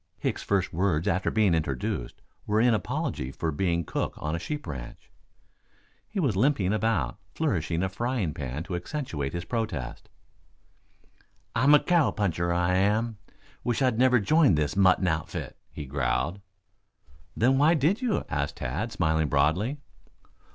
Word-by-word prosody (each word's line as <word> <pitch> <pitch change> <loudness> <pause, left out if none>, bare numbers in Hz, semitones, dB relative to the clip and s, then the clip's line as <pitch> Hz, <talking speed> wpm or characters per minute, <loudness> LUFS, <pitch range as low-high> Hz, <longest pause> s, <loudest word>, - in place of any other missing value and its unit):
Hicks's - - -2
first 95 -2 0
words 90 0 +1
after 95 -1 +1
being 105 -5 +3
introduced 70 -6 -2 0.2
were 105 +1 +2
in 120 +1 +4
apology 65 -10 -2
for 80 +3 -2
being 85 +2 0
cook - - -2
on 75 +2 -3
a - - -3
sheep 150 - -5
ranch. 65 -6 -8 1.0
He 210 - -4
was 135 - +1
limping 105 -4 +2
about, 110 - 0 0.2
flourishing 85 +2 0
a 95 - 0
frying 115 - -2
pan 70 +2 -4
to 90 0 -5
accentuate 85 - -4
his 85 0 -4
protests. 90 - -4 1.5
"I'm 135 +6 +6
a - - +7
cowpuncher, 100 - +1
I 90 +1 +2
am. 105 +3 +1 0.4
Wish 120 +2 0
I'd 125 -3 +2
never 125 -1 +5
joined 145 - +4
this 75 +1 0
mutton 95 -1 +4
outfit," 80 -2 -3
he 75 - -7
growled. 70 +7 -1 1.0
"Then 130 +4 +3
why 155 +4 +5
did 165 - +1
you?" 245 -5 0
asked 70 +1 -2
Tad, 85 - -3
smiling 80 -4 +1
broadly. 85 - +1
95 Hz, 145 wpm, -27 LUFS, 80-120 Hz, 1.5 s, a